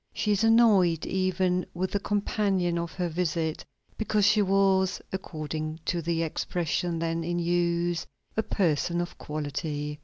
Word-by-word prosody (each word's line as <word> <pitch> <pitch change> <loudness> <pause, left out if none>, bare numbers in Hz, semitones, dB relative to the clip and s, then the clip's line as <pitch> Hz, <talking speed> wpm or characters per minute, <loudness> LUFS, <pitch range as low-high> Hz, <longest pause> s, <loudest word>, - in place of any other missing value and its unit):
She 210 - 0
is 205 +1 +2
annoyed 210 -8 +5
even 185 -1 +1
with 185 +2 -1
the 200 - 0
companion 195 -4 0
of 170 -1 -4
her 180 -2 -1
visit, 160 -2 -1 0.4
because 215 -2 +2
she 210 +1 +5
was, 195 -1 +3
according 155 -3 -4
to 175 -2 0
the 165 0 0
expression 170 +1 -1
then 165 0 -1
in 175 +1 -2
use, 175 0 0 0.3
a 220 - +2
person 175 -5 0
of 175 0 -4
quality. 150 0 -4
175 Hz, 145 wpm, -27 LUFS, 165-190 Hz, 0.4 s, annoyed